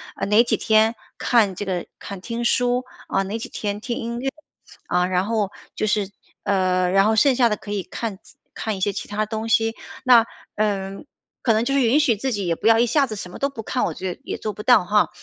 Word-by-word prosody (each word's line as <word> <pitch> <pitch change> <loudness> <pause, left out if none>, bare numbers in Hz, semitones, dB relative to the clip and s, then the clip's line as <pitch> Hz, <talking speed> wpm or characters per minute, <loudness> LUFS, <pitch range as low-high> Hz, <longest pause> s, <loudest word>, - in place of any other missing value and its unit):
啊， - - -2
哪 210 +3 +5
几 - - 0
天 220 +1 +3 0.2
看 215 -6 +3
这 205 - -4
个 185 -3 -2
看 200 -1 -7
听 235 +4 -4
书。 245 +1 +2 0.2
啊， 195 - +1
哪 205 +4 -4
几 - - -6
天 205 -1 -3
听 235 +2 -4
音 235 +1 -4
乐。 270 +2 -1 0.6
啊， 180 0 +2
然 180 0 0
后 215 -3 0 0.2
就 - - -1
是， 205 -2 +1 0.3
呃， 185 -2 +2
然 195 +1 +4
后 220 +1 +3
剩 260 +4 +4
下 245 -1 +4
的 210 - 0
可 205 - -9
以 200 -2 -1
看 220 -1 -5 0.4
看 220 -2 -2
一 - - -8
些 205 - +2
其 205 - -6
他 210 +1 -1
东 220 +1 -4
西。 225 0 +2 0.3
那， 245 -3 +7 0.3
嗯， 195 0 -2 0.4
可 230 - +3
能 220 +1 +2
就 275 - 0
是 275 - +3
允 245 +3 +4
许 280 -7 +3
自 265 +6 -2
己 200 -3 -2
也 165 - +1
不 215 - -1
要 225 0 +6
一 240 - +5
下 275 +3 +2
子 220 - -5
什 180 -3 -7
么 - - -9
都 280 - +2
不 235 -5 -8
看， 250 +3 -1
我 - - -2
觉 185 -1 -4
得 - - -33
也 - - -4
做 215 - -3
不 205 - -8
到 245 -5 +6
哈。 210 +3 +3
215 Hz, 265 characters per minute, -22 LUFS, 195-235 Hz, 0.6 s, 那